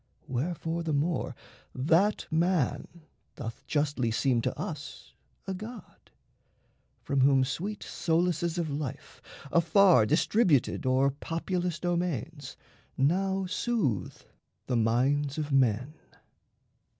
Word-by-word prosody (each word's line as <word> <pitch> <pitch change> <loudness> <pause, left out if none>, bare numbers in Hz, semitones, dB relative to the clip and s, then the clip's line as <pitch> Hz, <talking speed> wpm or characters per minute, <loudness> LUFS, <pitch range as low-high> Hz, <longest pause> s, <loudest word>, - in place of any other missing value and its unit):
Wherefore 165 +5 -2
the 160 -2 -2
more 155 +4 -1 0.4
That 170 +10 +2
man 165 -1 0 0.3
doth 115 -4 -7
justly 145 -5 0
seem 120 +1 +1
to - - -3
us 145 -3 -7 0.3
a 195 - -3
god, 215 +2 -10 0.9
From 140 -1 0
whom 135 0 +5
sweet 185 +11 -4
solaces 170 0 0
of 165 -4 -1
life, 140 -2 -6 0.3
afar 170 - +5
Distributed 155 - +2
o'er 130 +2 +3
populous 170 +4 -3
domains, 165 -5 -3 0.4
Now 190 +7 +1
soothe 180 - -1 0.4
the 125 - -1
minds 135 +6 +1
of 150 -1 -3
men. 130 +1 +2
155 Hz, 100 wpm, -29 LUFS, 135-175 Hz, 0.9 s, whom